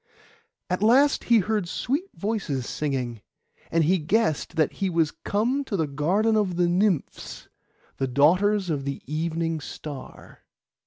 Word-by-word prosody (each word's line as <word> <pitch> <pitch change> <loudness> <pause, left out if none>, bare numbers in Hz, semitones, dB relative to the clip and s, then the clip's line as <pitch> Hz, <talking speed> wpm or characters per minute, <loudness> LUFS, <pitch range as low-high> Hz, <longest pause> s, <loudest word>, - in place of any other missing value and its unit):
At 180 +1 -2
last 260 +7 +4
he 235 - +5
heard 210 -2 0
sweet 290 - -2
voices 195 - -2
singing; 130 -6 -3 0.5
and 165 0 +2
he 180 +4 +3
guessed 165 0 0
that 155 -3 +2
he 195 - -2
was 165 -3 +1
come 245 +7 -1
to 205 - -2
the 160 - +1
garden 180 +11 +1
of 200 -5 +1
the 175 0 +2
Nymphs, 180 -2 -1 0.5
the 135 - -1
daughters 180 +8 +3
of 140 -3 -2
the 140 0 -5
Evening 165 +2 -2
Star. 145 -1 -9
175 Hz, 145 wpm, -25 LUFS, 150-210 Hz, 0.5 s, he